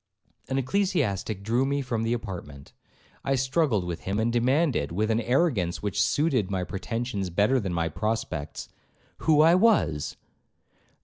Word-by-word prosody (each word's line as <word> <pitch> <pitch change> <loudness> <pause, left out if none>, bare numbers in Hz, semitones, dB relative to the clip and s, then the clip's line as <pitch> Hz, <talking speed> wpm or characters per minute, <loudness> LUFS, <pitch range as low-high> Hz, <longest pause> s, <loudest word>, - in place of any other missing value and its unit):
An 135 - 0
ecclesiastic 130 - 0
drew 115 +5 +1
me 140 +1 0
from 120 -3 -2
the 115 +1 -1
apartment. 85 -11 -7 0.5
I 135 - +1
struggled 135 - +1
with 85 -1 -4
him, 95 +2 -1
and 115 +2 +1
demanded, 125 - +1
with 105 +6 0
an 110 +1 +1
arrogance 120 - +1
which 100 -2 0
suited 135 - +1
my 95 -2 -1
pretensions 100 +1 -3
better 105 +9 +2
than 100 -5 -3
my 85 -1 0
prospects, 90 -4 -3 0.5
'Who 155 -2 +4
I 165 +2 +6
was?' 185 - +2
115 Hz, 145 wpm, -26 LUFS, 95-135 Hz, 0.5 s, I